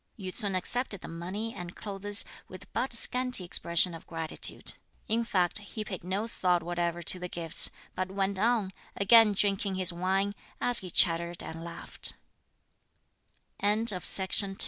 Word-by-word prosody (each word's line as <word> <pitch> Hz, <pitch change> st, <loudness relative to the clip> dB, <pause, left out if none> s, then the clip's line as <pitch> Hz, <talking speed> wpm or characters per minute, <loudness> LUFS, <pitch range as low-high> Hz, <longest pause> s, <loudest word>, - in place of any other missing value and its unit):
Yü 185 Hz, -3 st, -7 dB
ts'un 200 Hz, -5 st, -3 dB
accepted 205 Hz, +1 st, +3 dB
the -, -, -10 dB
money 190 Hz, +7 st, -6 dB
and 175 Hz, 0 st, -9 dB
clothes 205 Hz, 0 st, 0 dB, 0.2 s
with 185 Hz, -, -12 dB
but 265 Hz, -, -2 dB
scanty 250 Hz, -2 st, +1 dB
expression 170 Hz, 0 st, +3 dB
of 165 Hz, -, -12 dB
gratitude. 165 Hz, -1 st, 0 dB, 0.3 s
In 230 Hz, +2 st, -1 dB
fact, 185 Hz, -4 st, -1 dB
he 210 Hz, +1 st, -8 dB
paid 185 Hz, -5 st, -7 dB
no 190 Hz, +4 st, -3 dB
thought 180 Hz, -6 st, -1 dB
whatever 175 Hz, 0 st, -3 dB
to 180 Hz, -, 0 dB
the 180 Hz, 0 st, -7 dB
gifts, 165 Hz, -1 st, 0 dB, 0.2 s
but 185 Hz, 0 st, -4 dB
went 195 Hz, 0 st, -3 dB
on, 220 Hz, -3 st, 0 dB, 0.3 s
again 215 Hz, +1 st, +5 dB
drinking 195 Hz, -1 st, -1 dB
his 185 Hz, -2 st, +3 dB
wine, 190 Hz, +3 st, -2 dB, 0.3 s
as 245 Hz, -1 st, +4 dB
he 185 Hz, -, -8 dB
chattered 170 Hz, 0 st, +1 dB
and 165 Hz, +1 st, -9 dB
laughed. 170 Hz, 0 st, -1 dB
190 Hz, 145 wpm, -28 LUFS, 175-205 Hz, 0.3 s, again